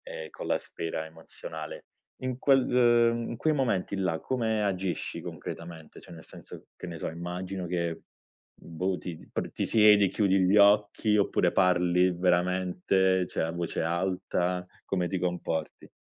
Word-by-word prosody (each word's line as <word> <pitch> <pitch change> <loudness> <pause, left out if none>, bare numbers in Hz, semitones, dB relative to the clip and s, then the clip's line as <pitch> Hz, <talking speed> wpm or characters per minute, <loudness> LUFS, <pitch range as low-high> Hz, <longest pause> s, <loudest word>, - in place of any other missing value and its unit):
e 80 0 -8
con - - -8
la - - +1
sfera 80 -1 -5
emozionale, 80 -1 -9 0.4
in 130 -1 -3
quel, 135 -1 +4
uhm, 120 -1 +3
in 115 - -5
quei 155 +6 +1
momenti 115 -9 0
là, 90 -4 -1
come 110 -3 -1
agisci 95 -2 -2
concretamente? 85 -2 -8
Cioè - - -13
nel 80 - -12
senso, - - -12
che - - -8
ne 85 - -6
so, - - -3
immagino 90 +3 -5
che 85 -1 -2 0.6
boh 90 +3 -2
ti 85 -2 -6 0.2
pr - - -3
ti - - -2
siedi 105 -2 +6
chiudi 95 -1 +2
gli 95 +2 +3
occhi, 105 +1 +4
oppure 95 -3 +2
parli 90 -1 +3
veramente 90 +1 +1
cioè - - -2
a 80 - -2
voce 85 0 -3
alta, 90 +1 -1 0.2
come 90 -2 -1
ti 95 - -2
comporti? 90 -2 -3
90 Hz, 155 wpm, -28 LUFS, 85-100 Hz, 0.6 s, siedi